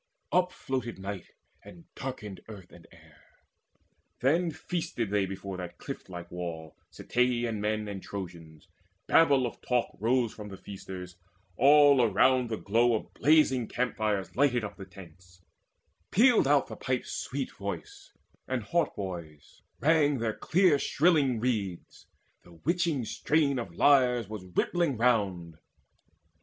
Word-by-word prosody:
Upfloated 135 -9 -1
night, 95 -1 -6 0.4
and 170 -2 -14
darkened 105 -8 -7
earth 100 -5 -11
and 85 -2 -16
air; 80 -3 -20 1.0
Then 165 +7 +2
feasted 160 - -4
they 100 -2 +1
before 95 0 -6
that 90 -1 -7
cliff - - -8
like 85 -1 -8
wall, 85 -3 -6 0.2
Ceteian 120 -3 0
men 105 0 -1
and 100 -2 -6
Trojans: 85 -5 -9 0.4
babel 140 -5 +4
of 120 - -6
talk 125 -1 -1
Rose 120 +1 +1
from 105 -1 -9
the 95 - -9
feasters: 95 -3 -9 0.4
all 145 - +6
around 125 +3 +3
the 110 - -2
glow 115 +4 +2
Of 110 - -5
blazing 140 -6 +3
campfires 110 -5 -2
lighted 125 -3 +2
up 105 - -6
the 95 - -8
tents: 90 -1 -16 0.7
Pealed 230 - +5
out 145 -1 +4
the - - -8
pipe's 130 -1 -2
sweet 135 0 -4
voice, 100 -1 -7 0.4
and 130 -3 -2
hautboys 90 - -4 0.2
rang 150 -1 +4
With 130 - -3
their 110 -1 0
clear 175 -4 +3
shrilling 145 -8 +2
reeds; 105 -7 -3 0.3
the 85 - -18
witching 160 - -1
strain 145 +1 +1
Of 95 -8 -7
lyres 125 -4 +4
was 105 -3 -7
rippling 145 - 0
round. 95 -9 0
115 Hz, 135 wpm, -29 LUFS, 95-135 Hz, 1.0 s, all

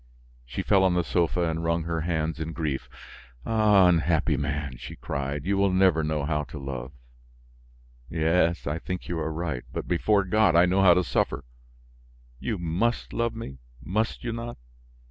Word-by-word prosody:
She - - -4
fell 95 -1 +4
on 95 -2 +3
the 90 - +2
sofa 90 +1 0
and 80 0 -2
wrung 85 0 0
her 85 0 -2
hands 80 -1 -1
in 80 +1 -4
grief. 75 -5 -3 0.6
"Ah! 105 -4 +5
Unhappy 85 -2 +2
man!" 70 -2 -3
she - - -8
cried, 70 +1 -4
"you 100 +1 +1
will 100 -1 +3
never 90 -4 +3
know 75 -2 -1
how 75 0 0
to 70 +3 -9
love!" 65 -2 -6 1.2
"Yes, 85 +1 +1
I 75 +3 -2
think 90 +1 -5
you 85 -1 -2
are 80 0 -2
right, 80 -5 -3
but, - - -5
before 100 +4 +2
God, 100 -2 +3
I 85 +1 +7
know 95 +2 +2
how 90 -3 +7
to 90 - +2
suffer. - - -1 1.0
You 110 - -2
must 90 +8 -1
love 115 -1 -1
me, 65 - -7 0.2
must 110 +5 -1
you 120 -1 -2
not? 115 +1 -6
85 Hz, 175 wpm, -26 LUFS, 75-95 Hz, 1.2 s, I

